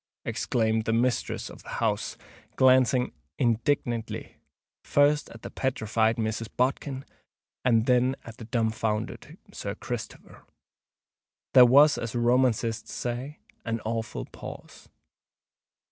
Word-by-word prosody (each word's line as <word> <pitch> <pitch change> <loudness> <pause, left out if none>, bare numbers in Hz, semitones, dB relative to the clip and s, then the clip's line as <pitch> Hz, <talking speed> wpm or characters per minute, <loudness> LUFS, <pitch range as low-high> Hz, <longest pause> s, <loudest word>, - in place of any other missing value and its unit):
exclaimed 110 -1 0
the 115 - 0
mistress 120 +2 0
of - - -11
the - - -13
house, - - -1 0.4
glancing 130 -1 +4 0.3
indignantly, 120 -1 -1 0.5
first 145 +1 +3
at 115 - -13
the - - -7
petrified 110 -3 0
Mrs. 110 0 -2
Bodkin 130 +1 -1 0.6
and 115 -3 +3
then 125 +1 +3
at 115 -1 -10
the 115 - -9
dumb 115 -1 0
founded 110 0 -3 0.2
Sir - - -5
Christopher. - - -7 1.1
There 125 -1 +9
was, 145 +4 +6
as 115 0 -5
romancists 120 -2 +1
say, 125 +5 -4 0.2
an 115 0 -2
awful 115 +1 -3
pause. - - -11
120 Hz, 115 wpm, -27 LUFS, 115-130 Hz, 1.1 s, There